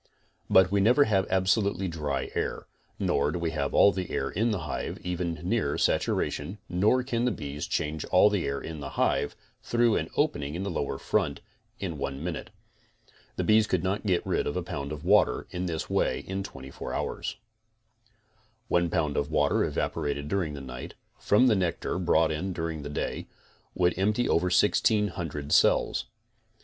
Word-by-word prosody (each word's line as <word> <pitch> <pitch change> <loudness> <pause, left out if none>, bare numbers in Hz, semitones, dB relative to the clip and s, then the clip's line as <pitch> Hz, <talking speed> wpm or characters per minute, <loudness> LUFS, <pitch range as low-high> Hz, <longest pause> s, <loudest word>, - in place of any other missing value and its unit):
But 95 0 +5
we 100 0 +3
never 125 +8 +5
have 95 -6 +1
absolutely 95 0 +1
dry 75 -5 -3
air, - - -2 0.3
nor 70 +1 +1
do 90 - -3
we 85 -2 -1
have 70 -3 -2
all 100 - +7
the 95 -3 -4
air - - -2
in 110 +5 +1
the 105 -6 -1
hive 75 -3 -4
even 90 -1 -2
near - - 0
saturation, 75 +8 0
nor 105 +8 +2
can 120 -2 -1
the 125 - +2
bees 75 -6 -5
change 75 0 -2
all 90 - +5
the 100 -6 0
air 70 0 -2
in 80 -1 -7
the 70 -1 -5
hive, - - +1 0.3
through 120 -1 +2
an - - -3
opening 70 +2 0
in 90 - -3
the 100 - -3
lower 70 -4 -2
front, - - 0 0.4
in 85 -7 -4
one 70 +1 -4
min 90 -1 -2
ute. - - -7 0.9
The - - -1
bees 110 0 +4
could 95 -3 0
not 95 +2 -1
get 95 -4 +1
rid - - 0
of 70 - -2
a 90 - -2
pound 70 -4 -5
of 75 -1 -6
water - - +3
this 90 -3 -3
way - - 0
in 95 +1 -4
24 65 -8 -7
hours. - - -3 1.3
One 85 -1 +2
pound 80 -4 0
of 70 - 0
water 75 -2 +2
evaporated 70 -2 -2
during 85 -4 -1
the 70 - -7
night, 65 -2 -8 0.2
from 105 +5 +4
the 120 -4 +5
nectar 90 -1 -1
brought 80 -2 +3
in 90 +5 -2
during 80 -2 -3
the 75 - -6
day, 75 - -3 0.5
would 90 -1 +3
empty 105 +5 +2
over 85 - +2
1600 90 -6 +1
cells. - - +3
90 Hz, 180 wpm, -28 LUFS, 75-100 Hz, 1.3 s, all